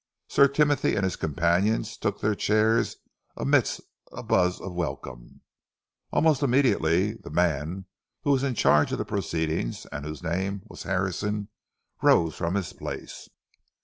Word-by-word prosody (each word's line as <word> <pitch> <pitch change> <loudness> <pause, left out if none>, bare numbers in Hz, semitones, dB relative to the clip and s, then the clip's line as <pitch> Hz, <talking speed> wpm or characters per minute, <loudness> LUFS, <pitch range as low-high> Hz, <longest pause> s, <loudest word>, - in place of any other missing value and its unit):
Sir 140 - +5
Timothy 145 +1 +2
and 100 - 0
his 95 - 0
companions 85 +8 0
took - - -2
their 110 - +2
chairs 110 +2 +2 0.4
amidst - - +1 0.3
a - - -8
buzz 90 0 +2
of 95 -1 -7
welcome. 70 -7 -6 0.7
Almost 155 -4 +3
immediately, 110 - +2
the 115 - -12
man 85 +2 0 0.4
who 145 - +2
was 135 -2 +3
in 135 -3 -1
charge 75 -7 +4
of - - -1
the - - -3
proceedings, 80 -8 -2
and 75 - -5
whose 75 +3 -7
name 95 +3 -2
was - - -11
Harrison, 100 +2 -1 0.5
rose 80 -2 +4
from 85 +2 -2
his 100 -3 -2
place. - - -7
95 Hz, 145 wpm, -26 LUFS, 80-110 Hz, 0.7 s, Sir